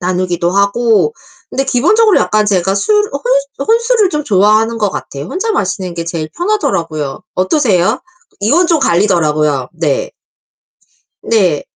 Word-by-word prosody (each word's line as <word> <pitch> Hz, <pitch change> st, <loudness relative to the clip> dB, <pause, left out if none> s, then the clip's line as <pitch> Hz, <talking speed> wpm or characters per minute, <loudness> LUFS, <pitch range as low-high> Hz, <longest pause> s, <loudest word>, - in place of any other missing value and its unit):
나누기도 180 Hz, -1 st, -1 dB
하고 215 Hz, -, +2 dB, 0.4 s
근데 270 Hz, -, -1 dB
기본적으로 385 Hz, -, +3 dB
약간 215 Hz, 0 st, +1 dB
제가 190 Hz, -1 st, +1 dB
술 310 Hz, -, +1 dB, 0.2 s
혼 275 Hz, +1 st, -2 dB
혼술을 460 Hz, -2 st, +2 dB
좀 300 Hz, -1 st, -2 dB
좋아하는 215 Hz, +2 st, +2 dB
것 210 Hz, -, +1 dB
같아요. 140 Hz, -5 st, -7 dB
혼자 420 Hz, -, -2 dB
마시는 190 Hz, -, -2 dB
게 170 Hz, -, -4 dB
제일 165 Hz, -2 st, -4 dB
편하더라고요. 215 Hz, -, -2 dB
어떠세요? 205 Hz, -, +1 dB, 0.4 s
이건 295 Hz, -, +3 dB
좀 335 Hz, -2 st, +2 dB
갈리더라고요. 155 Hz, -, +1 dB
네. -, -, -1 dB, 1.1 s
네. 185 Hz, -10 st, +1 dB
215 Hz, 305 characters per minute, -14 LUFS, 180-295 Hz, 1.1 s, 기본적으로